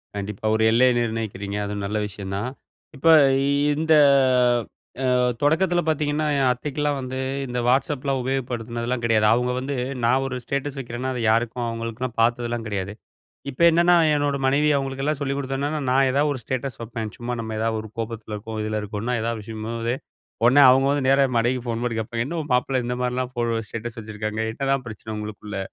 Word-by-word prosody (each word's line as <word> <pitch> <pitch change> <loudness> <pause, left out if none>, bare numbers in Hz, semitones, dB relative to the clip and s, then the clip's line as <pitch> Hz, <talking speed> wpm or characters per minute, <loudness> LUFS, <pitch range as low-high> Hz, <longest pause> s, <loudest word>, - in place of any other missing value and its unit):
கண்டிப்பா! 100 +1 -5
ஒரு 110 - +1
எல்லைய 125 +2 +5
நிர்ணயிக்கிறீங்க, 110 -3 -3
அதுவும் 100 0 -4
நல்ல 105 +2 -2
விஷயம் 95 -1 -7
தான். 120 +5 -2 0.5
இப்ப 165 - -1 0.7
இந்த 160 +1 +2 1.1
அ - - +2 0.3
தொடக்கத்துல 175 +4 +2
பாத்தீங்கன்னா, 150 0 0
என் 135 -2 +3
அத்தைக்கெல்லாம் 145 +3 -2
வந்து 130 0 -5 0.3
இந்த 125 0 -3
WhatsAppலாம் 135 +1 +1
உபயோகப்படுத்தினதுலாம் 120 -2 -3
கிடையாது. 110 -2 +3
அவுங்க 125 +2 +2
வந்து, 135 +2 -3 0.3
நான் 130 +3 +3
ஒரு 130 - -4
ஸ்டேட்டஸ் 140 +2 -3
வைக்கிறேன்னா 125 +1 -4
அதை 125 - -3
யாருக்கும் 120 +1 0
அவுங்களுக்குலாம் 115 +1 -4
பாத்ததுலாம் 120 0 0
கிடையாது. 100 -1 -3 0.6
இப்போ 140 +5 -3
என்னன்னா? 175 +2 +4 0.2
என்னோட 145 -1 0
மனைவி 145 +3 +3
அவுங்களுக்கெல்லாம் 135 +2 -2
சொல்லிக் 140 0 -1
கொடுத்ததுன்னால, 140 +2 -2
நான் 135 +1 +4
ஏதாவது 145 +3 +2
ஒரு 130 - -5
ஸ்டேட்டஸ் 130 +1 -3
வைப்பேன். 115 -2 -5
சும்மா 120 +1 -3
நம்ம 110 -1 -5
எதாவது 115 0 0
ஒரு 110 - -9
கோபத்துல 110 -1 -5
இருக்கோம், 110 +1 -7
இதுல 110 0 -2
இருக்கோம்னா, 105 +4 -3
எதாவது 115 -1 -2
விஷயங்கும் 110 +1 -6
போது, 115 +1 -1 0.5
உடனே 135 +4 +6
அவுங்க 135 +1 +4
வந்து 145 -2 0
நேரா 135 0 +5
என் 125 - -2
மனைவிக்கு 120 +2 0
ஃபோன் 115 0 -2
பண்ணி 120 -2 -1
கேட்பாங்க 115 +1 -2
"என்ன 170 +4 -4
உன் 150 - -10
மாப்ள 125 +2 +1
இந்த 125 - -2
மாரிலாம் 125 0 -1
ஃபோ 120 -2 -2 0.3
ஸ்டேட்டஸ் 115 +2 -6
வச்சுருக்காங்க? 110 0 -4
என்னதான் 135 +1 -1
பிரச்சனை 110 0 -8
உங்களுக்குள்ள?" 105 -1 -6
125 Hz, 175 wpm, -23 LUFS, 110-135 Hz, 1.1 s, உடனே